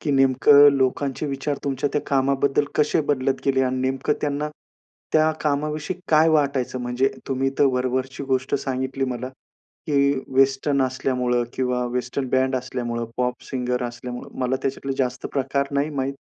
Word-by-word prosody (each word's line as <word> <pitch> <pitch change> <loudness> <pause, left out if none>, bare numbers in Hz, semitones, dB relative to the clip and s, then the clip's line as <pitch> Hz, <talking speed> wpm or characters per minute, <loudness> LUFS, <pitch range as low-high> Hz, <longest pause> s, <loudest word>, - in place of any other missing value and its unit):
की 150 - -2
नेमकं 135 +2 +6
लोकांचे 135 +2 0
विचार 140 +1 -2
तुमच्या 140 0 -1
त्या 150 - +1
कामाबद्दल 140 +1 +2
कसे 150 +1 +2
बदलत 135 -1 +1
गेले 135 -1 +2
आणि 130 0 0
नेमकं 130 +2 0
त्यांना 145 0 -1 0.6
त्या 155 0 +4
कामाविषयी 150 +4 -1
काय 155 +1 +5
वाटायचं? 140 -4 +1
म्हणजे 125 +2 +1 0.2
तुम्ही 135 0 0
तर - - +5
वरवरची 130 +1 -2
गोष्ट 130 0 0
सांगितली 130 0 -2
मला, 125 0 -4 0.6
की 140 -2 +3 0.2
वेस्टर्न 135 +1 +3
असल्यामुळं 125 -2 0
किंवा 125 -1 0
वेस्टर्न 125 +2 -2
बँड 130 0 +2
असल्यामुळं, 120 -2 -3
पॉप 125 0 -1
सिंगर 125 -1 -1
असल्यामुळं, 120 +1 -6
मला 130 +1 +1
त्याच्यातला 135 0 -2
जास्त 125 -1 -1
प्रकार 140 0 0
नाही 140 +2 0
माहित. 135 -1 -2
135 Hz, 145 wpm, -23 LUFS, 125-140 Hz, 0.6 s, नेमकं